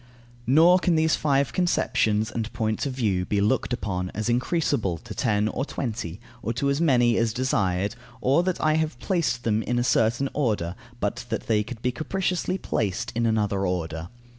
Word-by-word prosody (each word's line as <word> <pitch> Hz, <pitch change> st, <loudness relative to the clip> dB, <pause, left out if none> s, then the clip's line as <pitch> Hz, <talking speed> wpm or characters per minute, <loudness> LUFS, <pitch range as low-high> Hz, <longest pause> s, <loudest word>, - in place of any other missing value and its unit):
Nor 165 Hz, +7 st, +6 dB
can 175 Hz, -2 st, +2 dB
these 160 Hz, 0 st, +3 dB
five 140 Hz, -3 st, +1 dB
conceptions 110 Hz, -, +1 dB
and 115 Hz, -1 st, -3 dB
points 110 Hz, +4 st, -1 dB
of 135 Hz, -, -3 dB
view 105 Hz, -8 st, 0 dB
be 100 Hz, +3 st, 0 dB
looked 110 Hz, +8 st, +1 dB
upon 90 Hz, -6 st, -2 dB
as 110 Hz, +2 st, -1 dB
increasable 120 Hz, -, 0 dB
to -, -, -7 dB
ten 105 Hz, -3 st, +1 dB
or 120 Hz, +4 st, -2 dB
twenty, 110 Hz, -, -4 dB, 0.2 s
or 115 Hz, -, -2 dB
to 140 Hz, +4 st, 0 dB
as 140 Hz, +3 st, 0 dB
many 120 Hz, -7 st, +4 dB
as 115 Hz, -1 st, +1 dB
desired, 105 Hz, -7 st, 0 dB, 0.3 s
or 135 Hz, +6 st, +3 dB
that 180 Hz, 0 st, -1 dB
I 155 Hz, -, +2 dB
have 155 Hz, -5 st, -1 dB
placed 165 Hz, -5 st, -1 dB
them 110 Hz, -1 st, +1 dB
in 120 Hz, +2 st, -1 dB
a 120 Hz, -, +2 dB
certain 120 Hz, +2 st, +2 dB
order, 105 Hz, -, 0 dB, 0.3 s
but -, -, -2 dB
that -, -, -3 dB
they 110 Hz, -2 st, +2 dB
could 115 Hz, +2 st, -8 dB
be 125 Hz, -, +2 dB
capriciously 180 Hz, +5 st, -1 dB
placed 110 Hz, -, -2 dB
in 115 Hz, 0 st, +1 dB
another 105 Hz, -3 st, +1 dB
order. 80 Hz, -2 st, -3 dB
120 Hz, 185 wpm, -25 LUFS, 105-140 Hz, 0.3 s, Nor